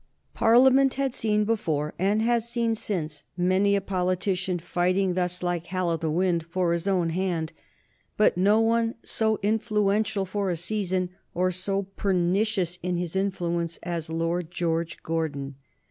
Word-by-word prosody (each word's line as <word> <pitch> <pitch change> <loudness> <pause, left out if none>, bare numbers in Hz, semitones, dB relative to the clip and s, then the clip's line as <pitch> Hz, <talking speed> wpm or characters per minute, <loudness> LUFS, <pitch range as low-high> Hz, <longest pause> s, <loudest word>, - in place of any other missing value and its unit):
Parliament 260 +3 +5
had 270 -2 -1
seen 210 -2 +1
before, 160 -9 -1
and 205 +4 +2
has 235 0 +1
seen 235 -1 +1
since, 160 -9 -4
many 185 +3 +3
a 200 - +1
politician 185 0 -1
fighting 180 +2 0
thus 180 0 -1
like 175 -1 -2
Hal 185 -1 -1
o' 165 - 0
the 160 -1 -2
Wynd 175 +1 +1
for 175 0 0
his 170 +2 -2
own 180 -4 +1
hand, 170 -3 -2 0.6
but 210 - +4
no 200 +4 +4
one 230 0 +2
so 220 -1 +1
influential 210 -1 +1
for 195 +1 -2
a 175 - -1
season 185 0 -1 0.2
or 185 +1 +1
so 195 +2 0
pernicious 190 -1 0
in 180 0 -1
his 175 0 -4
influence 175 -3 -1
as 170 -2 -3
Lord 165 +1 -1
George 170 -1 -2
Gordon. 150 -4 -2
185 Hz, 150 wpm, -26 LUFS, 170-210 Hz, 0.6 s, Parliament